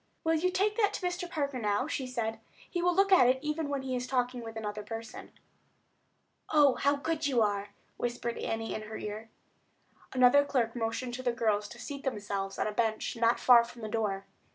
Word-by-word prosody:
"Will 325 - +2
you 330 +3 +2
take 410 +3 +1
that 415 -3 +3
to 365 - -4
Mr. 355 0 -2
Parker 280 -5 -2
now?" 210 +2 +1
she 280 -4 -3
said. 225 -3 -3 0.3
"He 350 - -2
will 355 0 +2
look 390 +1 +3
at 360 -10 +7
it 255 +1 +4
even 300 0 -2
while 280 -1 -1
he 260 -1 -3
is 250 0 -3
talking 250 -1 0
with 225 -1 -8
another 210 -1 -4
person." 225 +1 -8 1.2
"Oh, 290 -4 +5
how 285 +3 +2
good 315 +1 -1
you 245 -5 +3
are!" 205 -1 -1 0.3
whispered 240 -1 -3
Annie 225 0 -3
in - - -4
her 215 0 -7
ear. 215 +2 -6 0.8
Another 255 +2 +6
clerk 250 -5 0
motioned 230 +1 -2
to 255 - -4
the 250 -1 +1
girls 215 -3 0
to 235 - -12
seat 280 +1 -6
themselves 200 -6 -3
on - - 0
a 215 - -1
bench 220 +1 -1
not 230 0 +2
far 240 -2 +7
from 235 0 -11
the - - -3
door. 205 -3 -1
245 Hz, 205 wpm, -30 LUFS, 225-285 Hz, 1.2 s, at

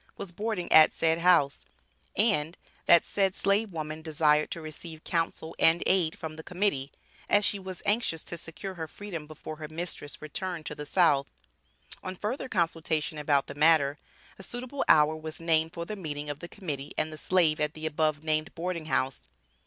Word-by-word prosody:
was 190 - -6
boarding 205 0 -3
at 155 0 +8
said 165 0 +1
house, 170 -5 +4 0.5
and, 185 -7 +2 0.3
that 170 - +7
said 195 -1 +1
slave 200 +2 +2
woman 155 -1 -5
desired 155 -1 +2
to - - -4
receive 155 0 -8
counsel 165 -1 -2
and 165 +1 +4
aid 180 -4 +2
from 155 -1 -6
the 160 - -8
Committee, 175 -8 -1 0.4
as 205 0 +5
she 200 - +2
was 185 -2 -8
anxious 205 -6 +1
to - - -6
secure 170 +3 -7
her 165 -3 -5
freedom, 170 -3 -7
before 155 0 -8
her 155 -1 -6
mistress 160 -2 -5
returned 165 +2 -4
to - - -4
the 150 0 -7
South. 145 -7 +3 0.7
On 185 0 -5
further 245 +7 -3
consultation 165 -4 0
about 145 -2 +2
the - - -8
matter, 145 -1 +4 0.4
a - - -8
suitable 255 +6 -4
hour 150 +1 +6
was 155 0 -7
named 160 -1 +2
for 170 -1 -4
the 215 - -5
meeting 150 -5 -4
of 145 - -8
the 170 - -7
Committee 150 -8 -6
and 155 0 -1
the - - -6
Slave 165 -3 +2
at 150 0 -1
the 155 0 -6
above 155 -1 0
named 155 0 -1
boarding 170 -1 -3
house. 130 -4 0
160 Hz, 185 wpm, -28 LUFS, 155-185 Hz, 0.7 s, at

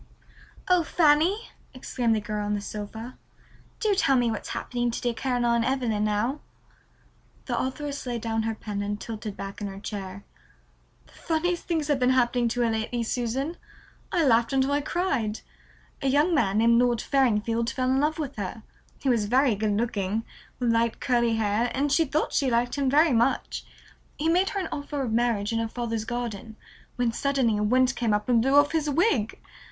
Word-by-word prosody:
"Oh, 365 -2 +4
Fanny," 325 +7 +2 0.2
exclaimed 245 -3 0
the - - +1
girl 210 0 -3
on 205 0 -1
the - - -2
sofa, 215 +4 -7 0.6
"do 430 -2 +2
tell 275 -8 +3
me 240 -2 +2
what's 220 - -5
happening 240 -1 -2
to 235 - -3
dear 240 -1 -1
Caroline 240 -2 +1
Evelyn 240 -5 0
now." 215 +7 0 1.1
The - - -2
authoress 280 +1 -3
laid 240 -2 -3
down 225 0 -1
her 225 0 -2
pen 210 -2 -5
and 205 0 -3
tilted 215 -2 -6
back 195 +2 -7
in 205 - -2
her 195 0 -7
chair. 200 -2 -6 0.8
"The - - -22
funniest 345 +2 -1
things 320 -4 0
have 290 -3 +1
been 250 0 +3
happening 240 -1 +2
to 245 +1 -1
her 235 -1 +2
lately, 225 +2 -2
Susan. 255 +8 -2 0.5
I 340 -4 +2
laughed 230 -2 +3
until 270 +1 +2
I 290 +1 +2
cried. 280 - -1 0.6
A 275 - 0
young 295 +6 +3
man 205 -9 +2
named 235 +2 +5
Lord 245 -1 +2
Farringfield 230 -3 +1
fell 255 -1 0
in 265 - +2
love 305 +2 +1
with 285 -5 -5
her. 205 +2 -5 0.3
He - - -5
was 235 -5 +2
very 255 +3 +3
good 210 0 0
looking, 215 -1 -1 0.3
with 245 -2 +1
light 230 0 +1
curly 235 -3 +2
hair, 220 +2 +1
and 280 +2 0
she 320 +3 +4
thought 300 +2 -1
she 275 -3 +2
liked 240 0 +1
him 280 -2 0
very 300 +2 +4
much. 235 +3 +1 0.5
He 315 +2 0
made 365 +3 +3
her 400 - -3
an 370 - -3
offer 285 -1 -3
of 230 -4 -2
marriage 230 -3 +1
in 225 - +1
her 225 - -1
father's 230 -1 -3
garden, 230 -2 -5 0.4
when 245 -2 +1
suddenly 260 -3 +1
a - - -1
wind 255 +4 +3
came 225 -3 +1
up 210 0 -3
and 240 -2 +4
blew 270 +4 +2
off 290 0 +5
his 315 -2 0
wig. 290 - +1
240 Hz, 190 wpm, -26 LUFS, 220-280 Hz, 1.1 s, named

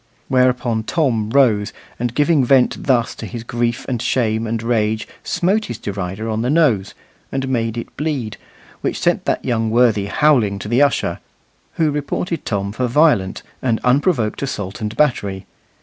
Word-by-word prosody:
Whereupon 125 -3 +2
Tom 115 -10 0
arose, 115 -6 +3 0.3
and 120 0 -2
giving 150 -1 +3
vent 125 0 +3
thus 120 -4 +2
to - - -8
his 120 -2 -6
grief 120 0 -2
and 125 -4 -2
shame 115 -3 0
and 115 0 -2
rage, 110 -2 0 0.2
smote 200 +5 +1
his 120 - -5
derider 100 +2 -4
on 110 0 -1
the 125 - -1
nose; 130 - +2 0.4
and 135 0 -2
made 115 -3 -1
it 115 - -7
bleed; 135 -8 -2 0.4
which - - -2
sent - - +1
that - - -1
young 115 -2 0
worthy 110 -4 +3
howling 120 -6 +3
to 100 - -7
the 120 +5 +2
usher, 145 -1 +1 0.5
who 160 -2 +1
reported 150 +4 -3
Tom 100 -2 -2
for 125 +4 -1
violent 120 -8 +2 0.2
and 115 -3 +1
unprovoked 125 - +1
assault 105 -6 -4
and 105 +1 -4
battery. 100 -10 0
120 Hz, 165 wpm, -19 LUFS, 110-135 Hz, 0.5 s, arose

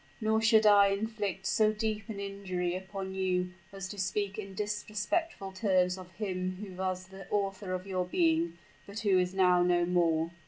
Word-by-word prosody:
Nor 220 -1 +2
should 220 -1 +5
I 205 -1 +7
inflict 200 -1 -2
so 215 +2 +3
deep 215 +1 -3
an 205 -2 -5
injury 190 -3 -3
upon 190 0 -5
you, 180 -1 0 0.2
as 195 -1 -6
to 205 - -7
speak 195 +2 -1
in 195 -2 -7
disrespectful 210 - -2
terms 185 -2 +2
of 185 -1 -11
him 185 -2 -3
who 195 0 -8
was 185 0 -3
the 190 -1 -11
author 195 -1 -1
of 185 0 -3
your 185 -2 -1
being, 170 -1 +1 0.3
but 200 +3 -6
who 200 -4 +4
is 180 +1 -1
now 180 -2 +5
no 175 -1 +3
more." 170 -2 +2
190 Hz, 180 wpm, -31 LUFS, 180-210 Hz, 0.3 s, I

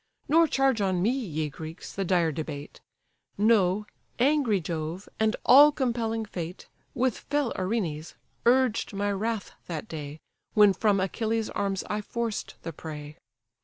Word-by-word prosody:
Nor 325 +3 +5
charge 270 -6 +2
on 190 -2 +1
me, 205 +7 +2
ye 170 - -2
Greeks, 160 +3 -8
the 195 - -2
dire 175 -3 +2
debate: 150 -1 -6 0.6
Know, 210 -2 +3 0.3
angry 260 -5 +3
Jove, 165 +2 -4
and 220 +1 +2
all 290 +4 +9
compelling 230 -5 -1
Fate, 175 -3 -7 0.3
With 255 -2 +1
fell 290 -4 -1
Erinnys, 185 -6 -2 0.3
urged 250 -4 +3
my 205 +1 0
wrath 215 +1 -2 0.2
that 170 +4 -5
day 150 -3 -7 0.4
When 210 -2 +7
from 200 +1 +2
Achilles' 220 +3 -1
arms 195 -2 -1
I 210 0 -2
forced 230 0 -4
the 165 - -5
prey. 150 0 -8
205 Hz, 140 wpm, -27 LUFS, 170-235 Hz, 0.6 s, all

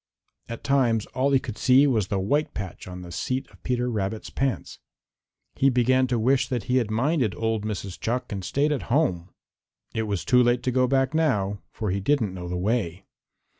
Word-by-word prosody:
At 115 - -6
times 120 -6 +2
all 130 +2 +1
he 140 - +4
could 115 -4 -6
see 130 +2 +5
was 115 -8 +1
the 100 - -1
white 145 +11 0
patch 95 -2 -6
on 90 0 -7
the 85 - -9
seat 130 +10 -2
of - - -20
Peter 125 -1 -1
Rabbit's 110 -2 -3
pants. 135 -1 -2 0.7
He 135 - +3
began 130 +1 +3
to 125 -1 0
wish 125 +3 +2
that 125 -6 -2
he 125 +4 +1
had 120 -4 +1
minded 120 - +1
old 110 -2 -1
Mrs. 100 -3 -5
Chuck 120 +2 -2
and 100 -2 -4
stayed 140 - +1
at 140 -5 -3
home. 95 - +1 0.6
It 110 -1 -1
was 100 -3 -2
too 125 0 +5
late 120 0 +2
to 125 - 0
go 130 0 +3
back 135 +1 +1
now, 105 -11 +1
for 105 -4 -3
he 100 - -1
didn't 110 -2 +1
know 90 -1 -6
the 90 - -2
way. 95 -2 -1
120 Hz, 205 wpm, -25 LUFS, 100-130 Hz, 0.7 s, see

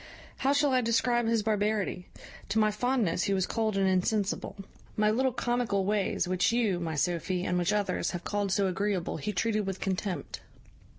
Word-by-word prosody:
How 270 - +1
shall 285 0 +3
I 255 - +4
describe 240 0 +1
his 225 -2 +1
barbarity? 210 -3 -1 0.4
To 220 - -1
my 215 -1 +4
fondness 210 -5 0
he 200 - +1
was 190 -1 +1
cold 220 -3 -1
and 195 -1 +2
insensible. 195 +2 0 0.4
My 210 0 +3
little 260 +4 +1
comical 240 -5 0
ways, 200 -2 0
which 185 +3 +2
you, 225 -7 +1
my 165 -2 -3
Sophy, 175 +4 -1
and 180 - 0
which 175 +2 +1
others, 210 -1 0
have 175 -1 -5
called 205 -1 -1
so 200 +1 +2
agreeable, 190 -1 -1
he 210 - -3
treated 210 +1 0
with 195 -1 -3
contempt. 190 -1 -3
205 Hz, 180 wpm, -29 LUFS, 185-225 Hz, 0.4 s, I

